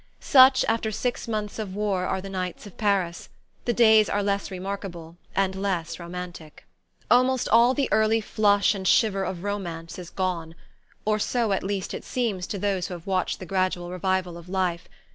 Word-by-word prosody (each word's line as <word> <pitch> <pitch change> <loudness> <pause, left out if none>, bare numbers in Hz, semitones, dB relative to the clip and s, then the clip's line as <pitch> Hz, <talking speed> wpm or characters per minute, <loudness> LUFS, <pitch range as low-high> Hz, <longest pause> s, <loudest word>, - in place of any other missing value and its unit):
Such, 260 -1 +6
after 225 -1 0
six 240 +3 -2
months 215 -1 -3
of 195 -3 -5
war, 200 -3 0
are 190 - -1
the 195 - -8
nights 185 0 -4
of 205 - -12
Paris; 195 -5 0 0.4
the 240 - +2
days 220 -3 +5
are 205 0 0
less 200 0 -1
remarkable 185 -3 -6 0.2
and 195 -1 +1
less 180 -4 -2
romantic. 175 -3 -8 0.5
Almost 255 +1 +4
all 235 +3 +5
the 280 -2 +1
early 220 +1 +3
flush 205 -1 +2
and 190 -2 -4
shiver 195 -3 +3
of 180 -2 -4
romance 175 -5 -5
is 175 -2 -8
gone; 170 -4 -3 0.5
or 215 0 +1
so 230 0 0
at 195 - +1
least 195 -1 -3
it - - -5
seems 215 -8 -2
to 205 - -4
those 195 -2 -1
who 180 - -6
have 170 - -11
watched 185 -2 0
the 185 - -8
gradual 185 -1 -1
revival 185 -1 -1
of 170 +1 -14
life. 180 -2 -1
195 Hz, 180 wpm, -25 LUFS, 180-215 Hz, 0.5 s, Such